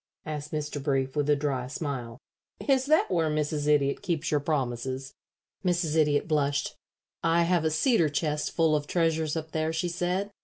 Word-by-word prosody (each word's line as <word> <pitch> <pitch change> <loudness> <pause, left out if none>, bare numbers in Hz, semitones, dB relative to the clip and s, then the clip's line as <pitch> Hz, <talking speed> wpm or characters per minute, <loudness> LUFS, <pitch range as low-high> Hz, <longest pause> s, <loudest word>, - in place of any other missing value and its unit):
asked 150 -1 -5
Mr. 150 -1 -3
Brief, 135 -1 0
with 145 -1 0
a 145 - +5
dry 140 -3 -2
smile. 130 -5 -4 0.5
"Is 265 -1 +3
that 310 -7 +3
where 165 -3 +2
Mrs. 150 -1 -1
Idiot 140 -2 +2
keeps 165 -3 -2
your 150 - +3
promises?" 130 -2 -2 0.5
Mrs. 175 -4 +1
Idiot 150 -2 +3
blushed. 145 -3 0 0.5
"I 165 +1 +3
have 170 -1 +2
a - - +3
cedar 165 - +3
chest 150 0 -1
full 160 -2 +2
of 145 -1 -2
treasures 160 -2 +1
up 160 0 -4
there," 160 0 0
she 165 +2 -1
said. 180 +4 -1
150 Hz, 175 wpm, -28 LUFS, 145-165 Hz, 0.5 s, a